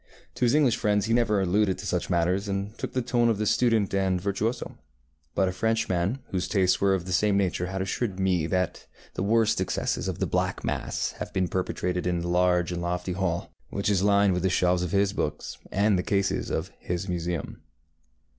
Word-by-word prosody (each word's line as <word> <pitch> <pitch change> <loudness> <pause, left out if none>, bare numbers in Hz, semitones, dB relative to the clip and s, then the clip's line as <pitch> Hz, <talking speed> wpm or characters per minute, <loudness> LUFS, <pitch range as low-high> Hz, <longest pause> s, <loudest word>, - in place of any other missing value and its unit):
To 125 - 0
his 120 +4 +3
English 135 -6 +3
friends 105 -2 +1
he 115 - 0
never 115 -4 +3
alluded 95 +1 +2
to 95 - -8
such 90 -2 -1
matters, 90 +3 +1
and 100 +2 -3
took - - -4
the 130 - 0
tone 120 -1 +2
of 110 - +1
the 105 - -1
student 115 -3 +2
and 95 -2 +1
virtuoso; 100 +5 -2 0.6
but 95 - +2
a - - 0
Frenchman 100 0 0
whose 90 -2 -1
tastes 95 -3 +2
were 100 -1 +4
of 90 -2 -4
the 90 - -3
same 100 +1 +3
nature 90 -2 0
has 95 +1 -3
assured 95 0 -2
me 90 -4 +1
that 90 0 -2 0.3
the - - -4
worst 110 0 +2
excesses 95 - -1
of - - -3
the - - 0
black - - -1
mass - - -2
have - - -5
been 95 -1 +1
perpetrated 90 0 -2
in 90 -1 0
that 85 - -3
large 90 0 +2
and 85 -1 -3
lofty 90 +1 -2
hall, 90 -2 -2 0.2
which 100 +1 -1
is 95 -3 +2
lined 100 -1 +4
with 90 - -1
the 95 - +2
shelves 90 -1 +2
of 90 - -2
his 100 +1 +2
books, 75 -5 -3
and 100 -1 +2
the - - +2
cases 100 +1 0
of - - -2
his 90 +2 -3
museum. 85 -1 -3
95 Hz, 210 wpm, -26 LUFS, 90-105 Hz, 0.6 s, were